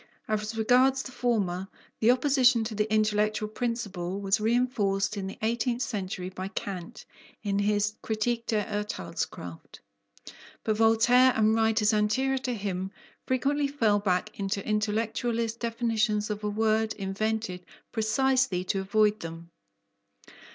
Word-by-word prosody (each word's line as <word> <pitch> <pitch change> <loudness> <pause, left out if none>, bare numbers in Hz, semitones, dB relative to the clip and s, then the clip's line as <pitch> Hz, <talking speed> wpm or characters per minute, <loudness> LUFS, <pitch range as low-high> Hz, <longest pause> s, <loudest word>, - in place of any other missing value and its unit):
As 215 +1 -2
regards 255 +4 +4
the 255 - -8
former, 205 -7 -1 0.3
the 225 - +3
opposition 255 -2 +4
to 220 0 -4
the 210 +1 -1
intellectual 215 0 +1
principle 205 -6 -3
was 195 +1 +1
reinforced 215 -4 +1
in 195 -2 -4
the 195 - -7
eighteenth 235 +2 0
century 185 -4 -4
by 185 0 -5
Kant 190 -3 -6 0.4
in 200 -1 0
his 205 +1 +1
Kritik 230 +2 -1
der 215 -2 +1
Urtheilskraft. 210 0 -5 0.8
But 215 -1 0
Voltaire 235 +3 +5
and 215 0 +3
writers 220 -1 +3
anterior 260 +6 +1
to 255 -2 -2
him 190 -3 -3 0.4
frequently 280 +3 +1
fell 225 -8 +2
back 200 +1 -1
into 200 0 -2
intellectualist 225 +2 -1
definitions 225 -2 0
of 210 0 -5
a 210 - 0
word 220 +1 +1
invented 200 -1 -2 0.3
precisely 245 -3 +1
to 195 +1 -1
avoid 210 +2 +2
them. 165 +1 -8
215 Hz, 130 wpm, -28 LUFS, 205-235 Hz, 0.8 s, Voltaire